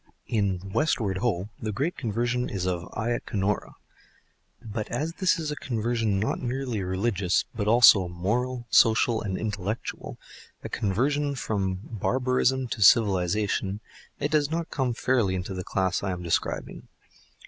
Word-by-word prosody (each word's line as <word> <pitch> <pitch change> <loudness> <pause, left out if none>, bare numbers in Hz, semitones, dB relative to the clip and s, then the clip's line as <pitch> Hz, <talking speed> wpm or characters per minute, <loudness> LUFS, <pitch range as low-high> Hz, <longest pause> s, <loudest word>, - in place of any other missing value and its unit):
In 95 -3 -1
"Westward, 110 - +1
Ho!" 105 -4 -1
the 110 - -2
great 140 - -1
conversion 120 +1 -1
is 95 -5 -3
of 90 -2 -2
Ayacanorah. 110 -3 -1 0.8
But 110 -2 -5
as 155 +7 -2
this 185 -1 +3
is 155 -2 -3
a - - -3
conversion 115 -5 -1
not 110 - -1
merely 125 -3 -2
religious 95 0 0
but 105 -3 -3
also 110 -5 +7
moral, 120 +8 -2
social 115 0 +4
and 95 -3 -3
intellectual, 105 0 -4 0.5
a - - -5
conversion 140 +7 0
from 95 -6 -2
barbarism 125 +3 0
to 110 - -4
civilisation, 100 -1 +3 0.4
it 145 - -1
does 150 -2 +2
not 165 +1 -3
come 130 -4 -1
fairly 115 -8 +1
into 90 +1 -4
the 90 0 -4
class 95 -1 0
I 100 - -2
am 90 0 -6
describing. 85 - -2
110 Hz, 140 wpm, -26 LUFS, 95-125 Hz, 0.8 s, also